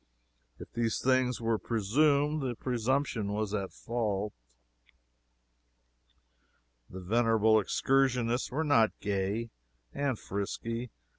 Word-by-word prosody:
If - - -11
these 115 -2 0
things 130 -1 +2
were 115 -1 0
presumed, 145 +7 +2
the 125 -3 -2
presumption 120 -3 -1
was 105 -1 -2
at 100 -3 -2
fault. 105 -4 -2 2.6
The 95 - -8
venerable 110 +2 +3
excursionists 125 +1 +1
were 150 +5 -1
not 115 -8 +3
gay 100 +3 -2 0.4
and 140 -4 -1
frisky. 115 +5 -4
115 Hz, 95 wpm, -30 LUFS, 105-130 Hz, 2.6 s, venerable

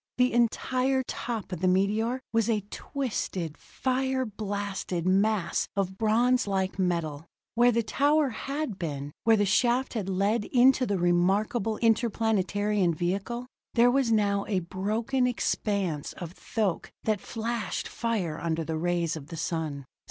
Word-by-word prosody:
The 250 0 +3
entire 255 +3 +1
top 230 -6 -4
of 180 - -4
the 185 - +2
meteor 210 +7 +1
was 225 0 +2
a 210 -3 0
twisted, 195 - -3
fire 260 +3 -1
blasted 200 -4 -3
mass 195 -1 +2
of 190 -1 -2
bronze 235 +2 +3
like 190 -1 -1
metal. 165 -4 -1 0.3
Where 240 +1 +5
the 235 0 +1
tower 290 +5 +2
had 275 -2 -4
been, 145 -4 -4
where 225 -1 +6
the 205 - +3
shaft 245 +6 +2
had 210 -5 -3
led 205 +4 +1
into 255 0 +4
the 200 - 0
remarkable 195 +5 +1
interplanetary 210 -3 +2
vehicle, 195 +9 -1 0.3
there 240 +1 +6
was 260 -3 +2
now 200 -2 +2
a 195 -4 0
broken 220 +9 0
expanse 200 - -1
of 170 -2 -7
thoque 195 -1 -2
that 215 -3 0
flashed 230 0 -3
fire 200 -9 -2
under 165 -1 -1
the 160 0 -3
rays 170 -1 0
of 145 -3 -8
the 165 0 -7
sun. 155 -4 -3
205 Hz, 145 wpm, -28 LUFS, 180-235 Hz, 0.3 s, where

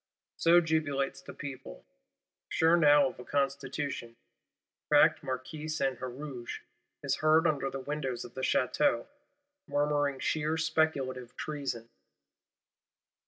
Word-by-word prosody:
—So 170 +1 +6
jubilates 145 -4 -1
the - - -9
people; 135 - -8 0.6
sure 165 +1 +4
now 145 -4 +6
of - - -13
a - - -7
Constitution. 140 -2 -2 0.7
Cracked - - +5
Marquis 130 +4 -5
Saint 140 -4 -1
Huruge 130 -1 -6 0.4
is - - 0
heard 155 +1 +4
under 145 -4 +1
the 135 - -5
windows 135 -2 -3
of 120 - -12
the 130 - -5
Château; 130 - +2 0.6
murmuring 145 -1 +1
sheer 155 +3 0
speculative 135 -6 0
treason. 135 -7 -4
140 Hz, 115 wpm, -30 LUFS, 130-155 Hz, 0.7 s, So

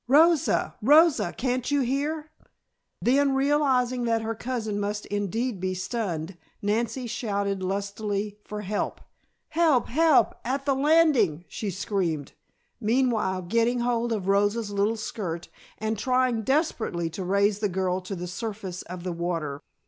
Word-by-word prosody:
Rosa! 315 +3 +4
Rosa! 285 - +5
Can't 250 0 -1
you 285 -1 +2
hear?" 295 +5 -2 0.7
Then, 275 +2 +3
realizing 265 -3 +2
that 230 -1 +1
her 225 +1 -2
cousin 225 -3 -3
must 205 +1 -2
indeed 205 +2 -2
be 185 0 -2
stunned, 185 -4 -3 0.2
Nancy 230 +5 -1
shouted 200 -4 -2
lustily 200 +2 -3
for 210 0 -6
help. 205 +1 -2 0.5
"Help! 315 -7 +3
Help! 315 +2 +4
At 270 +3 -2
the 280 - +3
landing!" 270 - +3
she 210 - -4
screamed, 185 -7 -2 0.5
meanwhile 220 -5 +1
getting 230 +6 +1
hold 240 -1 0
of 205 -4 -2
Rosa's 205 +2 +2
little 205 +3 +1
skirt 175 -6 -5 0.3
and 220 -1 -2
trying 255 -2 +2
desperately 235 - 0
to 185 +4 -5
raise 200 +2 +2
the 210 -1 0
girl 185 0 -1
to 185 +2 -5
the 180 0 -5
surface 190 -1 -5
of 180 0 -8
the 180 -1 -3
water. 165 -4 -3
220 Hz, 140 wpm, -26 LUFS, 195-255 Hz, 0.7 s, Rosa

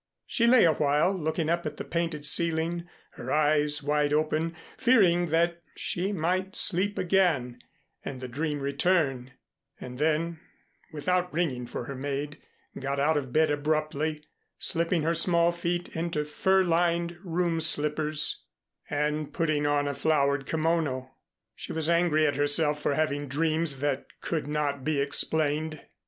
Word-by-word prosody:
She 235 -1 +1
lay 245 -3 +6
awhile 155 +3 +2
looking 160 -1 -2
up 170 0 0
at 150 0 -6
the - - -5
painted 165 -3 -3
ceiling, 170 +2 0 0.2
her 130 - -7
eyes 150 -1 +2
wide 150 0 +1
open, 155 +2 0 0.2
fearing 195 -9 +3
that 170 +2 +1
she 185 +3 -2
might 185 +2 -1
sleep 200 +2 +2
again 165 -10 +1 0.4
and 130 - -6
the 130 - -6
dream 145 +3 -3
return; 140 -3 0 0.5
and 125 0 -8
then, 160 +2 0 0.5
without 180 +4 -1
ringing 140 -7 -2
for - - -5
her 140 - -6
maid, 145 +2 -4 0.4
got 140 +1 -2
out 155 +3 +2
of 135 -4 -2
bed 155 +2 +3
abruptly, 155 +1 -1 0.3
slipping 165 -1 0
her 165 +2 +1
small 170 0 +4
feet 175 +1 -3
into 165 -2 -2
fur 190 +5 +2
lined 170 0 +1
room 170 -2 -1
slippers 150 -1 0 0.4
and 150 0 -1
putting 155 -3 0
on 145 0 +1
a 140 - -1
flowered 140 -2 +1
kimono. 155 -5 -1 0.4
She - - -7
was 160 +1 +1
angry 170 -2 +3
at 145 -2 0
herself 150 +1 +2
for 145 - 0
having 145 -2 -1
dreams 155 0 +1
that 145 -2 -1
could 160 -4 -3
not 145 -2 -2
be 150 0 0
explained. 155 +2 0
155 Hz, 145 wpm, -27 LUFS, 145-170 Hz, 0.5 s, lay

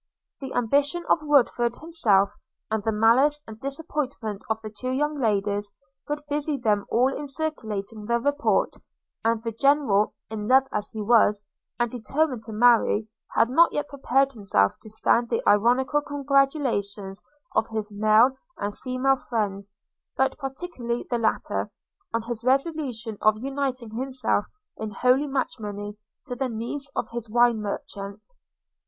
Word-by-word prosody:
The 270 -1 -6
ambition 285 +8 +2
of - - +4
Woodford 245 -5 +2
himself, 215 - +2 0.4
and 220 -1 0
the 220 +2 0
malice 240 +8 +4
and 220 0 -10
disappointment 275 -7 -3
of 220 0 0
the 215 -1 -7
two 255 +4 -5
young 295 +4 0
ladies, 205 -3 0 0.4
would 295 0 -3
busy 295 0 0
them 210 -5 +1
all 255 +3 +2
in 295 - -5
circulating 220 -8 -4
the 235 0 +2
report; 285 +4 +1 0.5
and 230 0 +1
the 230 - -2
General, 230 -4 +2
in 215 -1 -5
love 265 +2 +6
as 210 0 -1
he 220 -2 -5
was, 210 -2 +4 0.4
and 240 -1 +1
determined 255 +2 -1
to 220 - -8
marry, 220 -1 +3 0.3
had 230 +2 +3
not 335 +5 +5
yet 295 0 -2
prepared 275 0 +1
himself 195 - +2
to 220 - -11
stand 230 +2 +2
the 230 - -1
ironical 250 +7 +3
congratulations 275 -9 0 0.3
of 220 - +2
his 215 -1 -3
male 215 +4 +5 0.3
and 205 0 -3
female 260 +1 +1
friends, 200 -5 -3 0.4
but 265 0 +2
particularly 270 -4 -4
the 240 - +1
latter, 225 - -1 0.4
on 230 - -1
his 230 -1 -5
resolution 260 -5 0
of 215 0 +4
uniting 260 -2 -3
himself 255 -2 -1 0.3
in 220 - -4
holy 255 +7 +2
matrimony 210 -6 -3 0.3
to 250 -4 -5
the 260 +1 -2
niece 240 +5 -3
of - - -1
his 235 -1 -4
wine 240 -1 +3
merchant. 200 0 -5
235 Hz, 150 wpm, -25 LUFS, 215-275 Hz, 0.5 s, love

